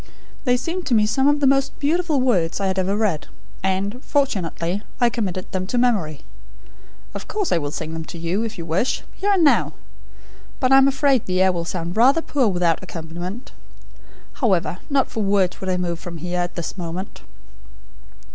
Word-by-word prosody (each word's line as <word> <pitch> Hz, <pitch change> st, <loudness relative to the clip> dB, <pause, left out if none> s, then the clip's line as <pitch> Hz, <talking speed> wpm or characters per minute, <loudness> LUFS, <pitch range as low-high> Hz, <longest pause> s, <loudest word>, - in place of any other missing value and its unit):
They 250 Hz, -1 st, +3 dB
seemed 340 Hz, +7 st, -4 dB
to 245 Hz, -, +3 dB
me 210 Hz, -1 st, +4 dB
some 265 Hz, +6 st, +2 dB
of 290 Hz, 0 st, +3 dB
the -, -, +4 dB
most 275 Hz, 0 st, +2 dB
beautiful 310 Hz, 0 st, +1 dB
words 190 Hz, -11 st, +1 dB
I 200 Hz, -, -1 dB
had 190 Hz, 0 st, 0 dB
ever 190 Hz, +2 st, 0 dB
read; 205 Hz, -8 st, 0 dB, 0.3 s
and, 195 Hz, +6 st, -1 dB
fortunately, 195 Hz, -, -1 dB, 0.2 s
I 240 Hz, -2 st, +4 dB
committed 185 Hz, -6 st, -3 dB
them 185 Hz, 0 st, -2 dB
to 245 Hz, -, -1 dB
memory. 200 Hz, -, +1 dB, 0.9 s
Of -, -, -7 dB
course, 415 Hz, -3 st, -2 dB
I 170 Hz, -, +3 dB
will 145 Hz, -2 st, -3 dB
sing 160 Hz, +1 st, -5 dB
them 160 Hz, 0 st, -5 dB
to 170 Hz, -, -8 dB
you, 170 Hz, +5 st, -1 dB
if 225 Hz, -1 st, -4 dB
you 170 Hz, -, -5 dB
wish, 170 Hz, +11 st, 0 dB
here 405 Hz, -, -2 dB
and 380 Hz, -4 st, +3 dB
now. 290 Hz, -, +4 dB, 0.9 s
But 255 Hz, 0 st, +2 dB
I 270 Hz, -, +8 dB
am 270 Hz, -, +6 dB
afraid 275 Hz, -3 st, +2 dB
the 185 Hz, 0 st, 0 dB
air 190 Hz, -, +4 dB
will 170 Hz, -2 st, -3 dB
sound 170 Hz, 0 st, -4 dB
rather 270 Hz, +8 st, +5 dB
poor 270 Hz, -5 st, +1 dB
without 175 Hz, -4 st, +2 dB
the -, -, -10 dB
accompaniment. 175 Hz, +7 st, -7 dB, 0.9 s
However, 190 Hz, -6 st, +1 dB
not 275 Hz, -2 st, +2 dB
for 220 Hz, -, -4 dB
worlds 195 Hz, -2 st, +1 dB
would 190 Hz, -, -3 dB
I 180 Hz, -, +1 dB
move 170 Hz, -2 st, -2 dB
from 170 Hz, -1 st, -7 dB
here, 180 Hz, +2 st, -3 dB
at 175 Hz, 0 st, -2 dB
this 175 Hz, +2 st, -5 dB
moment." 175 Hz, +3 st, -5 dB
195 Hz, 195 wpm, -22 LUFS, 175-260 Hz, 0.9 s, I